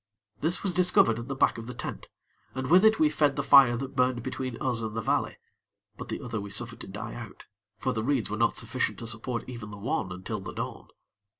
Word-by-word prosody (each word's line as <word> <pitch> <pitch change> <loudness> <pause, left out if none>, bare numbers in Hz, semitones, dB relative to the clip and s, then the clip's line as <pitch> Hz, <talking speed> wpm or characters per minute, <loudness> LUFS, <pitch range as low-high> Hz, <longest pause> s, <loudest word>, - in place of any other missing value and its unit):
This 165 +4 0
was 195 -3 0
discovered 175 -10 +4
at 120 - -7
the 135 - -3
back 135 - +2
of 115 - -8
the 125 - -6
tent, 120 - -6 0.5
and 130 +2 -3
with 185 +3 +7
it 220 0 +6
we 315 - +5
fed 145 - +2
the 140 - -1
fire 125 -3 +7
that 135 +2 -6
burned 125 -2 +1
between 130 -1 -4
us 125 -3 0
and 110 0 -4
the - - +1
valley; - - 0 0.6
but - - -8
the - - -4
other 115 -4 -3
we 100 - -7
suffered 115 +3 -3
to - - -8
die 105 +3 -6
out, 115 -4 -9 0.3
for 130 - -1
the 110 -2 -2
reeds 130 -2 +1
were 105 - -3
not 115 +2 +1
sufficient 115 +3 -1
to 115 - -7
support 115 +2 -3
even 120 -4 -7
the 105 - -9
one 100 -3 -2
until 95 +1 -5
the - - -7
dawn. - - -5
120 Hz, 235 wpm, -28 LUFS, 115-135 Hz, 0.6 s, with